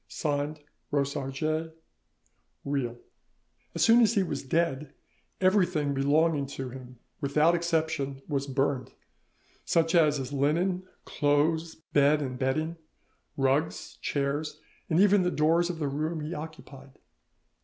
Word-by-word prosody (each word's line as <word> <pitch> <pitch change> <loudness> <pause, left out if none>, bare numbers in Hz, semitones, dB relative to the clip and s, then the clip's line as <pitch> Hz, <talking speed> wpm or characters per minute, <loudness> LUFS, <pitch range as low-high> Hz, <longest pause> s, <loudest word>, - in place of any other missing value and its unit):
"(Signed) 150 0 -2 0.3
ROSARGES. 145 +3 -1 0.9
"REILH." 135 -4 -2 0.8
As - - +2
soon 235 +1 +6
as 230 0 +4
he 200 - +3
was 145 -6 -3
dead 150 -1 -1 0.4
everything 180 -7 +2
belonging 145 +1 +2
to 130 -2 -4
him, 125 -1 -11 0.2
without 155 +3 +3
exception, 160 -5 -1
was 140 -2 -2
burned; 135 -1 -1 0.7
such 165 -1 +1
as 155 -4 +4
his 135 0 -5
linen, 170 +7 +1 0.2
clothes, 160 +3 +1 0.2
bed 145 +1 +4
and 130 -3 -4
bedding, 155 +5 -1 0.6
rugs, 135 +4 0
chairs, 145 +2 -2 0.3
and 160 - +2
even 200 0 +5
the 180 - +1
doors 165 +2 +2
of 175 - -3
the 150 -3 -2
room 155 +3 -2
he 155 +3 -4
occupied. 145 -4 -10
150 Hz, 120 wpm, -28 LUFS, 140-165 Hz, 0.9 s, soon